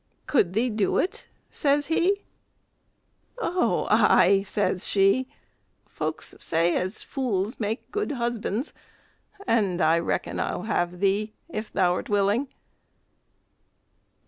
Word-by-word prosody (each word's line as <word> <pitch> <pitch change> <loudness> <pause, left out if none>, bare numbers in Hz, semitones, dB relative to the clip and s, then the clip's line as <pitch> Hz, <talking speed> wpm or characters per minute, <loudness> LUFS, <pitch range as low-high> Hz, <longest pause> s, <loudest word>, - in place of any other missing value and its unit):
"Could 190 - +2
thee 235 +4 +1
do 210 -2 +1
it?" 370 - -2 0.2
says 290 0 +1
he. 365 +6 +1 1.2
"Ou, 360 -2 +1
ay!" 195 0 +5
says 200 -3 -1
she; 200 +6 +3 0.6
"folks - - -4
say 165 +1 +1
as 185 +4 -2
fools 225 -4 -2
make 220 +1 -3
good 420 -7 -2
husbands, 235 0 -2 0.7
and 200 - +1
I 160 0 +4
reckon 170 - -2
I'll - - -2
have 180 -4 -1
thee, 205 +2 +1 0.2
if 215 -8 -5
thou 180 -1 +2
'rt - - -5
willing." 205 +6 +2
210 Hz, 115 wpm, -26 LUFS, 190-260 Hz, 1.2 s, ay